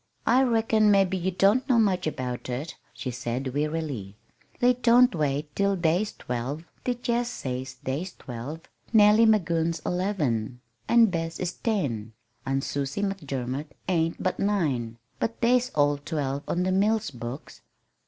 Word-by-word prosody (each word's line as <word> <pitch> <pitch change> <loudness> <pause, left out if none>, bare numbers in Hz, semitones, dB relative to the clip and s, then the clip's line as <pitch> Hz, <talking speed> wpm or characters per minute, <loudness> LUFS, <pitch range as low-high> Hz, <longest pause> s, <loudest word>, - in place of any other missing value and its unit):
"I 250 +3 +5
reckon 225 -3 +3
mebbe 195 -2 +4
ye 185 0 0
don't 205 +9 +2
know 250 - +5
much 190 -6 +2
about 125 -4 -4
it," 135 +6 -4 0.2
she 125 - -5
said 125 +2 -3
wearily. 145 -9 -3 0.4
"They 250 +1 +5
don't 245 0 +5
wait 150 -2 -2
till 200 0 +2
they's 175 +4 +1
twelve. 125 +6 -4 0.2
They 250 - +1
jest 240 0 -1
says 130 0 -4
they's 155 +8 -3
twelve. 125 +6 -7 0.3
Nellie 215 0 +6
Magoon's 170 -6 +2
eleven, 145 - -1 0.3
an' 235 -1 +6
Bess 165 -1 -3
is 180 -1 -2
ten, 125 - -2 0.3
an' 135 0 +1
Susie 140 +7 -3
McDermot 140 -7 -3 0.2
ain't 165 -3 0
but 185 - -1
nine 140 - 0 0.2
but 230 - -2
they's 250 +1 +3
all 145 -1 +3
twelve 140 -2 -2
on 180 - 0
the 185 - 0
mill 210 +4 +3
books. 120 +4 -8
165 Hz, 145 wpm, -26 LUFS, 135-205 Hz, 0.4 s, Nellie